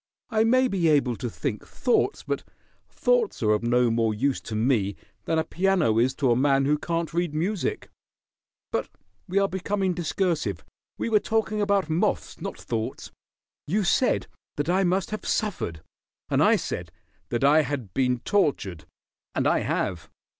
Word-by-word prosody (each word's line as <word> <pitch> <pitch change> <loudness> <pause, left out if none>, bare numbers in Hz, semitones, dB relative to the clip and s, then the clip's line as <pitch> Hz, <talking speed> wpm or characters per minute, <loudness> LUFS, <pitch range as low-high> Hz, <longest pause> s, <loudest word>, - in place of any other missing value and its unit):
I 220 -1 +3
may 255 +3 +4
be 185 -7 +1
able 140 -6 +3
to 125 - -3
think 115 -1 -4
thoughts, 255 - 0
but - - -3 0.5
thoughts - - +1
are 105 - +3
of 105 - +2
no 120 0 +3
more 115 -1 +1
use 135 +5 0
to 110 - -6
me 110 -4 +1 0.3
than 160 - 0
a 160 - +2
piano 175 - +2
is 130 +3 +2
to 135 -4 +2
a - - +4
man 135 +1 +3
who 150 +1 +2
can't 165 0 -2
read 170 -3 -1
music. 200 - -1 0.8
But - - -1 0.4
we 190 +1 -2
are 200 0 +4
becoming 190 0 -1
discursive. 165 - -1 0.3
We - - -2
were 215 -2 +4
talking 220 -1 0
about 200 -3 +2
moths, 170 +6 -1
not - - -5
thoughts. 110 -1 -4 0.6
You 200 +7 +1
said 220 +7 +2 0.3
that 145 +3 -2
I 190 +2 +3
must 185 +1 0
have 215 -2 -4
suffered, 110 - -2 0.5
and - - +3
I - - +6
said - - -4 0.4
that 120 +2 -1
I 150 +3 +6
had 130 - -4
been 125 -2 +1
tortured, 100 - 0 0.5
and - - +1
I - - +3
have. 85 -3 -2
155 Hz, 170 wpm, -26 LUFS, 120-195 Hz, 0.8 s, I